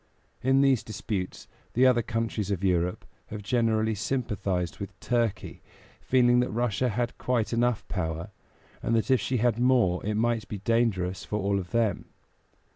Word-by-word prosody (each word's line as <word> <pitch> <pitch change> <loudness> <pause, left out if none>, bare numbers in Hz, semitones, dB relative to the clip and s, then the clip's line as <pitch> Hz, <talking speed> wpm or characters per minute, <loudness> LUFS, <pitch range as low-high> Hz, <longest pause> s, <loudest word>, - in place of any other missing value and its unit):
In 135 +1 +3
these 135 -4 +4
disputes 95 -3 -5 0.3
the 125 +2 +4
other 125 -2 +5
countries 115 -3 -2
of 100 -2 -2
Europe 90 -1 0 0.2
have 105 -1 -7
generally 110 -1 +1
sympathized 100 - -2
with 95 -1 -7
Turkey, 120 -4 -1 0.4
feeling 125 -1 +4
that 125 - +1
Russia 120 +1 0
had 120 +2 -2
quite 120 -3 0
enough 120 -1 +1
power, 80 -3 -3 0.5
and 115 - 0
that 115 +3 +1
if 130 - +4
she 130 - -1
had 120 0 +1
more 120 -8 +3
it 105 +1 -1
might 115 -1 0
be 105 - -5
dangerous 100 -4 0
for 105 - -3
all 100 0 +1
of 90 -2 -7
them. 110 -2 0
110 Hz, 160 wpm, -27 LUFS, 100-120 Hz, 0.5 s, other